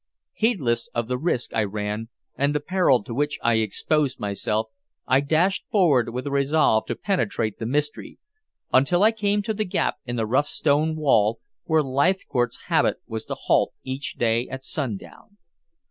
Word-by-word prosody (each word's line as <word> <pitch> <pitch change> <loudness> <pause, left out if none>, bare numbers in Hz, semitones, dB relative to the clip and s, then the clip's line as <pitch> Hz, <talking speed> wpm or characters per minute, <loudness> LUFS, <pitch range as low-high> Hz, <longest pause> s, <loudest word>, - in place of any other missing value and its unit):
Heedless 135 - 0
of 120 -1 -1
the 125 0 -1
risk 140 -5 -1
I 110 - +2
ran 105 +2 -4 0.3
and 140 +2 0
the - - +2
peril 150 - +2
to 115 - -7
which 145 +4 -1
I 115 -1 +3
exposed 130 +6 0
myself, 105 +1 -1 0.4
I 130 - +4
dashed 160 +7 +1
forward 145 - +3
with 125 +2 -5
a 140 - -3
resolve 140 -5 +2
to - - -2
penetrate 115 - -1
the 115 - -3
mystery, 150 +3 -2 0.6
until 155 +9 +4
I 220 - +6
came 205 -2 0
to 220 +1 -1
the 215 +1 -1
gap 180 - -1
in 120 - -3
the 115 -2 0
rough 130 +6 +1
stone 155 +2 +1
wall 115 -8 +2 0.3
where 160 -3 +3
Leithcourt's 135 -3 0
habit - - +2
was 110 -1 -5
to - - -4
halt - - +1
each 130 +2 -5
day 115 +1 +1
at 130 0 -7
sundown. 140 - -6
135 Hz, 170 wpm, -24 LUFS, 115-160 Hz, 0.6 s, I